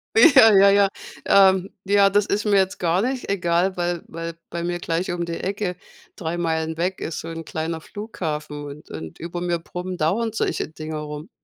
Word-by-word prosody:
Ja 290 - +8
ja 200 +1 +7
ja, 200 0 +5 0.4
ähm, 190 -1 +5 0.2
ja, 200 0 +5
das 205 +1 +2
ist 205 +1 -1
mir 205 -1 +3
jetzt 190 -1 +1
gar 175 +1 +2
nicht 255 +1 -2
egal, 180 -1 +1
weil 175 -1 -1
weil 165 0 -6
bei 170 0 -4
mir 175 0 -2
gleich 170 +1 -2
um 175 -1 -2
die 170 - -4
Ecke 195 -1 -2 0.4
3 170 0 -3
Meilen 160 -1 -1
weg 180 +3 -2
ist 160 - -4
so - - -7
'n 165 0 -6
kleiner 160 +1 -4
Flughafen 155 -8 -5
und 145 +1 -10
und 80 0 -8
über 175 +1 -5
mir 175 -1 0
brummen 180 +2 -6
dauernd 210 +9 0
solche 220 - -1
Dinger 155 0 -6
rum. 150 +2 -7
175 Hz, 195 wpm, -23 LUFS, 160-195 Hz, 0.4 s, Ja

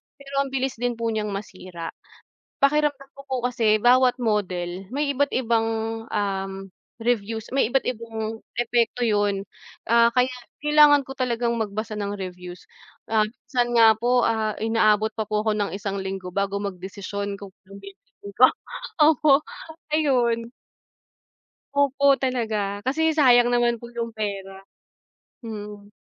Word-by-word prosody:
pero 275 0 -4
ang - - -6
bilis 265 -3 -2
din 245 -1 -1
po 230 0 -2
niyang 215 -1 -2
masira. 185 -4 -7 0.7
Pakiramdam 280 -1 +2
ko 275 - -11
po 265 - -3
kasi 225 -4 +2
bawat 250 +1 +5
model 185 -4 -2
may 285 +1 0
iba't 285 +2 +1
ibang, 230 -3 +1 0.5
um, 195 -1 -3 0.3
reviews 225 -1 -1
may 245 -3 +2
iba't 270 - +1
ibang 225 -2 -4 0.2
epekto 240 0 +1
yun, 205 -2 0 0.4
ah, 235 +1 +5
kaya 250 +1 +2 0.3
kailangan 295 -1 +6
ko 270 - -7
talagang 240 -2 0
magbasa 215 0 -3
ng 205 -1 -3
reviews, 180 -1 -8 0.4
ah, 220 -1 +3
minsan 240 +2 -2
nga 225 -2 +6
po, 245 +2 +2
ah, 220 -1 0
inaabot 220 -1 +2
pa 220 - -1
po 210 0 -1
ako 215 - +2
ng 205 -4 -1
isang 200 +1 -4
linggo 190 -1 -5
bago 200 +2 -1
magdesisyon 200 +1 -5
kung 200 -1 -11
anong 195 +1 -12
bibilhin 200 0 -13
ko 255 - +8 0.5
opo, 300 -2 +5 0.6
ayun. 240 -6 +1 1.2
Opo 280 -1 +3
talaga, 220 -6 -2
kasi 315 +6 +1
sayang 245 -5 +6
naman 240 -1 +2
po 235 - -10
yung 230 -1 -3
pera, 195 -3 -5 0.8
mhm. 210 -2 -8
225 Hz, 140 wpm, -24 LUFS, 200-250 Hz, 1.2 s, ko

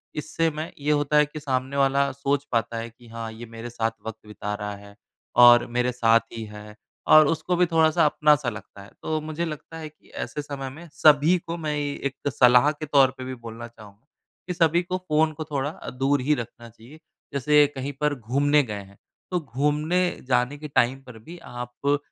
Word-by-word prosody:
इससे 160 +2 -1
मैं 155 +2 -5
ये 145 +1 0
होता 145 0 +2
है 150 - +6
कि 150 +1 -9
सामने 135 -1 -2
वाला 140 0 +2
सोच 140 +1 -1
पाता 115 -1 -1
है 115 +1 -5
कि, 120 +1 -19
"हाँ, 115 0 -6
ये 115 +2 -9
मेरे 115 +1 -8
साथ 115 -1 -1 0.2
वक़्त 110 -1 -8
बिता 105 -1 -5
रहा 105 -1 -5
है, 100 0 -14 0.4
और 120 0 +8
मेरे 125 +1 0
साथ 115 -2 +4
ही 115 - -5
है।" 105 0 -11 0.3
और 155 -1 +8
उसको 160 +3 0
भी 180 +1 +4
थोड़ा-सा 160 -1 +3
अपना-सा 150 -3 +3
लगता 105 -2 -10
है। 100 - -14
तो 155 0 -1
मुझे 155 +2 -3
लगता 160 +1 -7
है 155 -1 -7
कि 150 - -27
ऐसे 150 - -5
समय 140 -2 -6
में 160 +6 -11
सभी 150 +5 +5
को, 170 0 -6
मैं 155 -2 -3
एक 140 -2 -3
सलाह 125 +2 +5
के 155 0 -7
तौर 140 -3 +4
पे 130 - -7
भी 130 0 -5
बोलना 115 -1 -9
चाहूँ, 105 -4 -16 0.5
कि 180 - -2
सभी 170 0 +3
को 180 +1 -3
फ़ोन 155 +1 +2
को 155 - -5
थोड़ा 140 0 -1
अ, 155 - -9
दूर 135 +2 0
ही 145 +4 +2
रखना 120 -1 -8
चाहिए। 120 +7 -16 0.3
जैसे 150 +2 +4
कहीं 135 +2 -4
पर 150 -1 +1
घूमने 145 +6 +2
गए 105 -5 -5
हैं, 100 0 -18 0.3
तो 180 - +1
घूमने 150 +5 0 0.3
जाने 125 +2 +1
के 150 +1 -7
टाइम 135 -1 +1
पर 125 -3 -12
भी 165 +11 -11
आप 125 +2 -3
140 Hz, 205 wpm, -24 LUFS, 120-150 Hz, 0.5 s, और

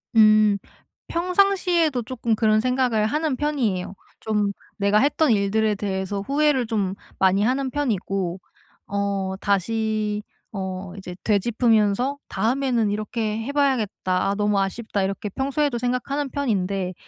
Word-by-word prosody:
음. 215 -1 +6 0.5
평상시에도 355 -5 +2
쪼끔 235 -1 -2
그런 215 -1 +3
생각을 250 -3 +1
하는 300 +4 0
편이에요. 245 -11 -1 0.3
좀 210 -2 0 0.3
내가 200 +1 +3
했던 290 0 +3
일들에 210 +1 +2
대해서 195 0 -3
후회를 280 0 +2
좀 200 -4 -1 0.2
많이 190 +2 +3
하는 265 +3 +1
편이고 195 -9 -2 0.5
어 200 -1 -1
다시 210 +1 0 0.3
어 190 -2 -5
이제 180 -2 -8
되짚으면서 225 +3 +2
'다음에는 240 -2 +1
이렇게 215 +1 -2
해 275 - -4
봐야겠다. 225 -10 0
아 - - -1
너무 205 -1 +1
아쉽다.' 200 +1 -2
이렇게 195 +2 -3
평소에도 270 +3 -1
생각하는 250 +4 -1
편인데 195 -9 -1
215 Hz, 295 characters per minute, -23 LUFS, 200-260 Hz, 0.5 s, 음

